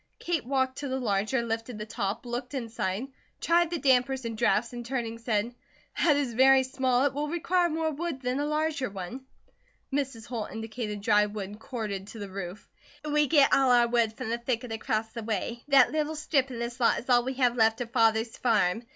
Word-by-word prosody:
Kate 335 Hz, -5 st, -1 dB
walked 260 Hz, 0 st, -1 dB
to 285 Hz, -, -4 dB
the 265 Hz, 0 st, -2 dB
larger, 215 Hz, +2 st, 0 dB
lifted 225 Hz, 0 st, -4 dB
the 210 Hz, -, -5 dB
top, 210 Hz, 0 st, -3 dB
looked 245 Hz, +4 st, -4 dB
inside, 225 Hz, -3 st, -3 dB, 0.3 s
tried 345 Hz, 0 st, +3 dB
the 345 Hz, -, -2 dB
dampers 265 Hz, -2 st, +2 dB
and 230 Hz, -1 st, -3 dB
drafts 235 Hz, +1 st, +1 dB
and 240 Hz, 0 st, -6 dB
turning 235 Hz, -2 st, -3 dB
said: 230 Hz, 0 st, -1 dB, 0.5 s
"That 305 Hz, -4 st, +5 dB
is 270 Hz, -5 st, -1 dB
very 265 Hz, +2 st, +6 dB
small. 260 Hz, 0 st, +1 dB
It 285 Hz, -, +1 dB
will 295 Hz, +2 st, -2 dB
require 345 Hz, +2 st, +1 dB
more 320 Hz, 0 st, -1 dB
wood 310 Hz, -1 st, -4 dB
than 255 Hz, +1 st, -2 dB
a 290 Hz, -, 0 dB
larger 300 Hz, -4 st, -1 dB
one." 200 Hz, +8 st, -7 dB, 0.7 s
Mrs. 270 Hz, -6 st, -2 dB
Holt 230 Hz, -4 st, -4 dB
indicated 220 Hz, -2 st, -5 dB
dry 210 Hz, 0 st, +4 dB
wood 205 Hz, 0 st, -7 dB
corded 215 Hz, -6 st, -5 dB
to 225 Hz, -, -10 dB
the 205 Hz, -2 st, -6 dB
roof. 190 Hz, 0 st, -7 dB, 0.4 s
"We 300 Hz, 0 st, +2 dB
git 285 Hz, -2 st, +5 dB
all 270 Hz, -1 st, +4 dB
our 240 Hz, -1 st, +5 dB
wood 235 Hz, -2 st, +1 dB
from 220 Hz, -, -4 dB
the 235 Hz, -, -1 dB
thicket 240 Hz, 0 st, -3 dB
across 220 Hz, 0 st, -2 dB
the 230 Hz, +1 st, -7 dB
way. 225 Hz, +2 st, -3 dB
That 275 Hz, -3 st, +6 dB
little 310 Hz, +1 st, -1 dB
strip 285 Hz, -3 st, 0 dB
an' 250 Hz, -, -6 dB
this 235 Hz, +1 st, -4 dB
lot 235 Hz, -, +3 dB
is -, -, -7 dB
all 245 Hz, -2 st, +4 dB
we 260 Hz, +1 st, -3 dB
have 250 Hz, -2 st, +2 dB
left 225 Hz, -1 st, +3 dB
of 235 Hz, -1 st, -5 dB
father's 225 Hz, -1 st, +2 dB
farm. 225 Hz, -1 st, +1 dB
240 Hz, 205 wpm, -28 LUFS, 225-270 Hz, 0.7 s, very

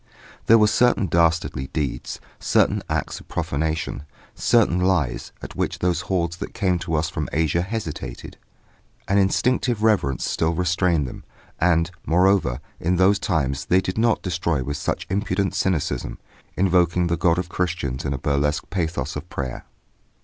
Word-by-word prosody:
There 115 Hz, -, +8 dB
were 105 Hz, -, +5 dB
certain 115 Hz, 0 st, +3 dB
dastardly 85 Hz, -6 st, +1 dB
deeds, 75 Hz, -4 st, -3 dB, 0.2 s
certain -, -, +2 dB
acts -, -, -2 dB
of -, -, -16 dB
profanation, 80 Hz, +1 st, -2 dB, 0.3 s
certain 105 Hz, -7 st, +3 dB
lies, 90 Hz, -8 st, 0 dB
at -, -, -8 dB
which -, -, -1 dB
those 90 Hz, -1 st, 0 dB
hordes 85 Hz, -2 st, -1 dB
that -, -, -7 dB
came 95 Hz, -5 st, +1 dB
to 85 Hz, -2 st, -2 dB
us 75 Hz, +1 st, +1 dB
from 80 Hz, -3 st, -4 dB
Asia 80 Hz, +2 st, +1 dB
hesitated; 95 Hz, -4 st, -5 dB, 0.7 s
an 100 Hz, +1 st, +3 dB
instinctive 120 Hz, +3 st, +1 dB
reverence 95 Hz, -12 st, +2 dB
still 80 Hz, +1 st, 0 dB
restrained 90 Hz, -4 st, +1 dB
them; -, -, -9 dB, 0.4 s
and, 85 Hz, 0 st, +2 dB
moreover, 90 Hz, -7 st, +2 dB, 0.2 s
in 90 Hz, +3 st, +1 dB
those 95 Hz, +3 st, +4 dB
times 70 Hz, -8 st, -1 dB
they 90 Hz, -, +4 dB
did 95 Hz, +2 st, -3 dB
not 115 Hz, -1 st, +2 dB
destroy 85 Hz, -6 st, -1 dB
with 70 Hz, +3 st, -3 dB
such -, -, -2 dB
impudent 100 Hz, 0 st, -1 dB
cynicism, 90 Hz, -6 st, -1 dB, 0.4 s
invoking 90 Hz, -2 st, +3 dB
the 85 Hz, 0 st, +1 dB
God 85 Hz, 0 st, +2 dB
of 90 Hz, 0 st, -2 dB
Christians 85 Hz, -8 st, -2 dB
in -, -, -2 dB
a 70 Hz, -, -1 dB
burlesque 70 Hz, +1 st, -1 dB
pathos 80 Hz, -8 st, -2 dB
of 75 Hz, +4 st, -6 dB
prayer! 65 Hz, -3 st, -5 dB
85 Hz, 155 wpm, -23 LUFS, 80-95 Hz, 0.7 s, There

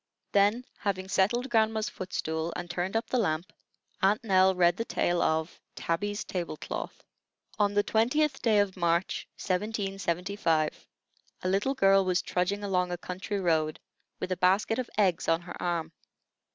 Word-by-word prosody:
Then, 205 Hz, +5 st, +3 dB
having 190 Hz, -2 st, -2 dB
settled 225 Hz, +7 st, +1 dB
grandma's 220 Hz, -1 st, +2 dB
foot 185 Hz, 0 st, -7 dB
stool, 160 Hz, +1 st, -2 dB
and 175 Hz, -, -4 dB
turned 180 Hz, +3 st, -3 dB
up 225 Hz, -, -1 dB
the 255 Hz, -, 0 dB
lamp, 180 Hz, -1 st, -1 dB, 0.5 s
Aunt 205 Hz, +4 st, +3 dB
Nell 190 Hz, -3 st, +4 dB
read 175 Hz, -1 st, +4 dB
the 230 Hz, -, -1 dB
tale 175 Hz, -6 st, 0 dB
of 160 Hz, +1 st, 0 dB
TABBY'S 205 Hz, +5 st, -2 dB
TABLE 175 Hz, -4 st, -4 dB
CLOTH. -, -, -6 dB, 0.6 s
On 205 Hz, -1 st, +2 dB
the 205 Hz, -, +4 dB
20th 270 Hz, +7 st, +1 dB
day 220 Hz, -3 st, +3 dB
of 205 Hz, -2 st, +2 dB
March, 170 Hz, 0 st, 0 dB
1775, 195 Hz, -4 st, -1 dB, 0.6 s
a -, -, 0 dB
little 200 Hz, +9 st, +1 dB
girl 195 Hz, -4 st, +5 dB
was 185 Hz, -1 st, +1 dB
trudging 195 Hz, +3 st, -1 dB
along 180 Hz, -2 st, 0 dB
a 175 Hz, -, -2 dB
country 190 Hz, +3 st, -4 dB
road, 160 Hz, -4 st, +1 dB, 0.4 s
with 185 Hz, -, -4 dB
a 185 Hz, -, 0 dB
basket 195 Hz, +6 st, +2 dB
of 255 Hz, -, -3 dB
eggs 185 Hz, -5 st, +2 dB
on 165 Hz, +1 st, +2 dB
her 175 Hz, 0 st, -9 dB
arm. 170 Hz, -2 st, -1 dB
190 Hz, 160 wpm, -29 LUFS, 175-205 Hz, 0.6 s, girl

